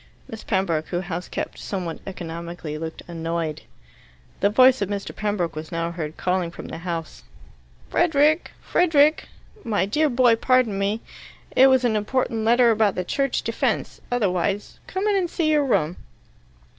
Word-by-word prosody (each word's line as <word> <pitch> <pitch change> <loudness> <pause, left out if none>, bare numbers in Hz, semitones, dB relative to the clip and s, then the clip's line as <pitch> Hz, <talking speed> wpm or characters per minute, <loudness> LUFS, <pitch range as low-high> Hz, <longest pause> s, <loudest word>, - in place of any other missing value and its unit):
Miss 220 -1 -8
Pembroke, 180 -6 0
who 175 0 -2
house 175 -1 -5
kept - - -5
somewhat 180 -5 -4
economically, 170 -3 -6
looked 160 +1 -6
annoyed. 165 -2 -3 0.8
The 200 - +3
voice 255 +2 +5
of 200 - -1
Mr. 200 -1 -4
Pembroke 205 -6 -2
was 155 +1 -7
now 165 0 -2
heard 160 -2 -5
calling 180 -1 0
from 170 - -9
the 160 - -6
house, 165 -2 -5 0.7
"Frederick! 310 -1 +3
Frederick! 310 -3 +3 0.4
My 205 -4 +1
dear 300 +10 +1
boy, 245 -2 +4
pardon 245 -4 +2
me. 205 +3 0 0.5
It 265 - +8
was 260 -1 +4
an 225 -3 +2
important 225 +1 -1
letter 235 +1 +5
about 215 -3 +2
the 180 - -1
Church 275 +6 0
Defence, - - -2
otherwise. 200 -3 -1
Come 380 +2 -3
in 420 -1 +2
and 365 -3 +1
see 320 -2 0
your 295 -2 +3
room." 180 -8 +1
205 Hz, 155 wpm, -23 LUFS, 170-255 Hz, 0.8 s, It